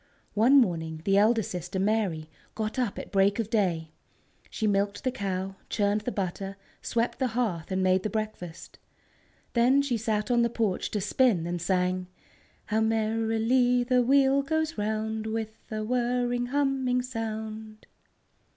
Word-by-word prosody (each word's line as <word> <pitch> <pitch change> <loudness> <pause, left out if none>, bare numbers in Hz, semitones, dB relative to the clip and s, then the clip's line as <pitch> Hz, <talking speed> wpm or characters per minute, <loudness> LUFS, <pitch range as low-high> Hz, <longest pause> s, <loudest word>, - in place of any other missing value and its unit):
One 245 +7 +6
morning 160 -7 -1
the 195 - +3
elder 220 +2 +4
sister, 180 +1 -5
Mary, 190 -6 0 0.3
got 220 +3 -3
up 240 -6 -1
at - - -7
break 200 0 +3
of 225 -2 -3
day. 170 -7 0 0.6
She 220 - -3
milked 200 +1 0
the 255 - +1
cow, 195 -3 -3
churned 205 0 +1
the 245 - -3
butter, 195 0 -4 0.2
swept 235 +1 -1
the 260 - +2
hearth, 190 -9 -1
and 185 0 0
made 185 0 +3
the 215 - -2
breakfast. 215 -7 -6 0.7
Then 255 +4 +4
she 255 -4 0
sat 215 0 -1
on 240 -1 +4
the 235 - +2
porch 220 -5 -1
to 210 - -2
spin, 205 -3 +2
and 175 0 -3
sang: 180 0 0 0.6
"_How 220 +1 +2
merrily 225 +3 +2
the 250 0 +3
wheel 270 +2 +4
goes 315 +2 -1
round, 220 +1 -2
With 220 0 -4
a 215 -1 -3
whirring, 245 +1 0
humming 265 -2 +1
sound! 220 -2 -6
220 Hz, 150 wpm, -27 LUFS, 195-245 Hz, 0.7 s, One